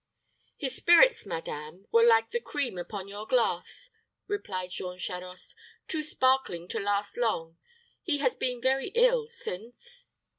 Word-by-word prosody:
"His 265 -2 -2
spirits, 455 - +5
madame, 160 +3 -6
were 230 - +6
like 225 -1 +5
the 475 - 0
cream 280 - -3
upon 195 +2 -6
your 205 +2 -7
glass," 245 - 0 0.3
replied 190 - -4
Jean 180 0 -5
Charost; 180 0 -6 0.3
"too 315 - 0
sparkling 260 - +1
to - - -2
last 205 0 -1
long. 165 -9 -1 0.4
He 320 -6 +1
has 270 -3 +2
been 250 -1 -2
very 265 +1 +2
ill - - +4
since." 470 - -8
230 Hz, 140 wpm, -29 LUFS, 185-305 Hz, 0.4 s, were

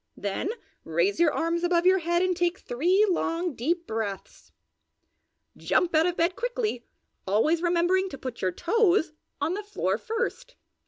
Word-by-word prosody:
then 200 - -3 0.3
raise 405 -7 0
your 335 -3 +4
arms 335 +3 -1
above 350 0 +2
your 375 +1 +5
head 345 +1 +1
and 370 -1 +1
take 350 +1 0
three 360 - +2
long, 345 -2 -1
deep 335 +8 -1
breaths. 220 - -5 1.0
Jump 355 -1 +1
out 320 +2 +4
of 355 - -2
bed 340 +2 +1
quickly, 475 - -2 0.4
always 300 - +2
remembering 355 +2 +2
to 275 - -8
put 255 -3 -7
your 185 - +1
toes 350 - +2 0.3
on 335 - 0
the 405 - -3
floor 410 0 -2
first. 485 +2 -4
345 Hz, 155 wpm, -26 LUFS, 315-375 Hz, 1.0 s, your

